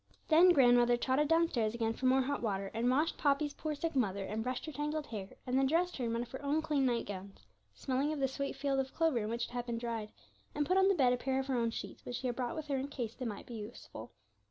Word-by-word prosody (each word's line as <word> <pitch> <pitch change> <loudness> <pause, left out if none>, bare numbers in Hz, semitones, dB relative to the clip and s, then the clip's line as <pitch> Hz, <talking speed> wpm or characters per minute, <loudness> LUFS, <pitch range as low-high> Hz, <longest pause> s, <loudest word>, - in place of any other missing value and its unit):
Then 335 +3 +7
grandmother 245 -6 +5
trotted 265 +4 +1
downstairs 295 -9 +2
again 225 -1 0
for 255 - -1
more 260 +1 +4
hot 285 +2 -2
water, 195 -3 -2
and 230 +2 +1
washed 300 +6 +1
Poppy's 285 0 +2
poor 310 -1 -3
sick 325 +1 -3
mother, 200 -6 0
and 215 +3 -3
brushed 250 +2 -3
her 315 - -5
tangled 300 +1 -2
hair, 200 -6 -6 0.2
and 255 - -1
then 270 0 +4
dressed 345 +5 +1
her 250 - -2
in 230 - -1
one 230 +1 -1
of 245 - -12
her 265 - -6
own 295 +3 +1
clean 290 -4 +1
night 240 -2 0
gowns, 195 0 -8 0.3
smelling 270 +2 -1
of 305 - -3
the 270 - +2
sweet 275 +1 -4
field 275 -1 0
of 265 0 -3
clover 325 -7 +2
in 210 -1 -3
which 235 +1 -1
it - - -12
had 245 0 -4
been 235 -1 -2
dried, 230 -2 -4 0.4
and 295 - +1
put 370 - +1
on 385 0 +5
the 395 - +4
bed 255 -6 +4
a - - 0
pair 265 +1 -1
of 265 - -2
her 265 -1 -1
own 230 -1 +1
sheets, 225 - -7
which 245 - -5
she 260 - -5
had 245 -1 -1
brought 255 +6 -2
with 315 -2 -4
her 280 -2 -1
in 265 +1 -2
case 240 -6 -4
they 255 - -6
might 210 -3 -5
be 240 - -9
useful. 220 +1 -8
260 Hz, 280 wpm, -33 LUFS, 235-290 Hz, 0.4 s, Then